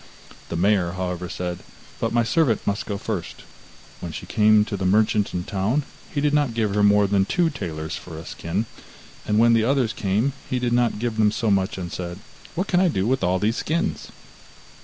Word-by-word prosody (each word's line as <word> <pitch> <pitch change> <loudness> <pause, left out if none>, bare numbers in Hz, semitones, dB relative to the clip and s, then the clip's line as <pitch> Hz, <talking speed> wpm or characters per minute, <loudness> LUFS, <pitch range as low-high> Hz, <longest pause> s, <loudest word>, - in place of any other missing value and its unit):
The - - -3
mayor, 90 -1 +2
however, 90 -1 -3
said: 90 -1 -4 0.4
'But - - -1
my 120 0 +3
servant 130 - +1
must 100 +1 -1
go 100 - -2
first.' 100 -4 -5 0.6
When 85 - -6
she - - -7
came 105 0 +4
to 105 - -4
the 95 - -4
merchant 105 +2 +2
in 90 - -3
the - - -11
town, 105 +9 +1 0.3
he 145 - -1
did 145 0 +1
not 145 -6 +2
give 110 -3 0
her 105 - +2
more 105 0 +5
than 100 -1 +2
two 170 - +1
talers 80 - -5
for 80 -3 -9
a 80 - -8
skin, 90 +7 -3 0.6
and 105 - +2
when 115 +1 +5
the 115 -1 +4
others 125 -2 +1
came, 105 +7 0 0.2
he 130 - 0
did 125 -1 0
not 120 -2 +2
give 115 0 -2
them 105 -1 +4
so 110 0 0
much, 95 +1 +1
and 90 -2 -5
said: 85 -1 -5 0.4
'What 185 +4 -1
can 180 - +2
I 185 - +4
do 95 - 0
with 130 +3 +1
all 90 +1 +2
these 110 +5 0
skins? 170 +6 -1
105 Hz, 215 wpm, -23 LUFS, 95-120 Hz, 0.6 s, more